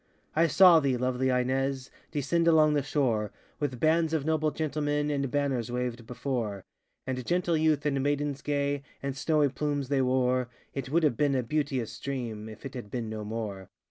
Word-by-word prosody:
I 165 +2 +4
saw 175 0 +7
thee, 135 -4 +1
lovely 130 +1 0
Ines, 130 +1 0 0.2
Descend 165 +4 0
along 155 -2 +5
the 145 - +2
shore, 125 -8 0 0.3
With 135 -5 -2
bands 160 0 +2
of 155 -3 0
noble 155 -1 +2
gentlemen, 150 0 -1
And 140 -2 -1
banners 135 -4 -1
waved 125 -2 -3
before; 115 -6 -3 0.4
And 130 -1 -3
gentle 175 +2 +1
youth 155 -2 +2
and 140 -2 +1
maidens 145 0 -1
gay, 145 -1 -1 0.2
And 140 -1 -2
snowy 150 0 +2
plumes 145 -1 -2
they 140 -2 +2
wore; 130 -1 +1 0.2
It 135 -2 -4
would 165 +4 +2
have 145 -7 +2
been 145 -2 +2
a 130 - +1
beauteous 130 -4 -2
dream, 115 -6 -4
If 110 +3 -11
it 135 - -6
had 120 -5 -7
been 115 -2 -4
no 110 -1 -4
more! 105 -3 -5
140 Hz, 180 wpm, -28 LUFS, 125-150 Hz, 0.4 s, saw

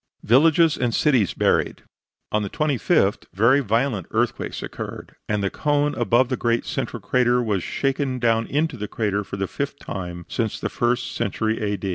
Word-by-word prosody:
VILLAGES 160 +6 +4
AND 120 -2 0
CITIES 130 - +2
BURIED - - +1 0.5
On 105 - +1
the 100 - -3
25th 145 - +1
very 115 +8 +5
violent 115 -4 0
earthquakes - - -2
occurred, - - -7
and 105 -1 0
the 100 - 0
cone 145 -1 +1
above 120 +1 +2
the 130 - 0
great 120 0 0
central - - -3
crater 125 -1 +2
was 105 -6 0
shaken 135 - -1
down 115 -2 +1
into 150 -1 -1
the 105 -1 -4
crater 105 -2 -1
for 100 0 -7
the 95 - -1
fifth 140 +5 -4
time 90 -6 -6
since 115 -3 -2
the - - -2
first 120 0 0
century 110 0 -1
A. 105 -1 -1
120 Hz, 170 wpm, -23 LUFS, 105-135 Hz, 0.5 s, very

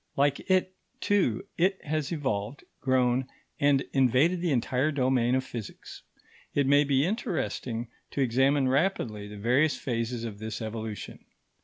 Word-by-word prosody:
Like 140 0 +3
it, 185 0 +2 0.3
too, 185 - +1
it 190 +2 +2
has 155 0 -2
evolved, 130 -6 -2 0.2
grown, 130 -1 +2 0.3
and 140 -1 +3
invaded 135 +7 +3
the 175 - 0
entire 130 +3 +1
domain 130 -3 +2
of 130 - +1
physics. 120 -5 -8 0.5
It 145 - +3
may 145 +2 +5
be 140 0 +2
interesting 125 - -2 0.2
to 140 - -2
examine 135 +2 +3
rapidly 130 - 0
the 105 0 -9
various 125 +9 +2
phases 115 -2 -3
of 105 -3 -6
this 110 0 -5
evolution. 110 -1 -6
130 Hz, 140 wpm, -28 LUFS, 115-145 Hz, 0.5 s, may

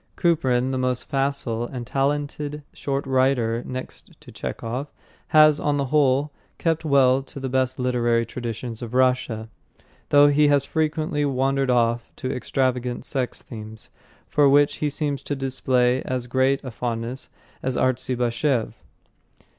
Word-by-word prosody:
Kuprin, 130 -7 +1
the 130 - -1
most 125 -1 -1
facile 135 -4 -1
and 125 -2 -6
talented 145 +2 -2
short 140 0 -2
story 135 - -5
writer 125 -3 +2
next 130 0 -8
to - - -13
Chekhov, 125 +5 -5 0.4
has, 155 -1 +6
on 145 0 0
the 140 - 0
whole, 145 0 +3 0.3
kept 165 -1 0
well 135 -3 +4
to 135 +1 -9
the 135 -1 -3
best 130 0 0
literary 120 -2 +1
traditions 115 -1 -6
of 120 0 -6
Russia, 125 -4 +1 0.6
though 145 0 +7
he 150 +1 +4
has 140 -1 +3
frequently 155 -1 -1
wandered 135 -1 +1
off 120 -1 +1
to 130 0 -3
extravagant 125 -1 -1
sex 130 -3 -3
themes, 110 -1 -10 0.4
for 145 -2 +4
which 145 +1 +4
he 150 - 0
seems 145 -1 -2
to 145 - -3
display 130 -1 +1
as 130 -1 -3
great 130 +3 +1
a 130 - -6
fondness 115 +2 -4 0.3
as 130 -1 -2
Artzybashev. 125 0 0
130 Hz, 145 wpm, -23 LUFS, 125-140 Hz, 0.6 s, though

